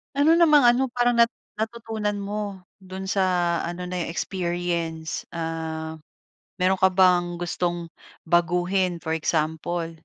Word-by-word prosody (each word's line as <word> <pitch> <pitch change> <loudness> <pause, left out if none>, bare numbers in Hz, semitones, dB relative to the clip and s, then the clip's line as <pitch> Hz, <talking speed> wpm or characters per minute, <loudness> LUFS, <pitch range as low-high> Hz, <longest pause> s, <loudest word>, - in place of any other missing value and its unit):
Ano 295 +4 +5
namang 300 -6 +6
ano, 250 +1 +3
parang 245 0 +2
nat 235 0 +5 0.2
natutunan 220 -2 -3
mo 200 -1 -4 0.2
dun 190 +1 -7
sa 195 0 +1 0.4
ano 175 +1 -5
na 180 - -5
yun, 165 - -4
experience? 170 -3 -3
Ah, 160 -1 -4 0.6
meron 185 0 +1
ka 190 - +6
bang 180 -2 +3
gustong 175 -1 -3 0.3
baguhin 175 +2 +1
for 160 - -3
example? 160 +1 -1
180 Hz, 125 wpm, -24 LUFS, 170-210 Hz, 0.6 s, namang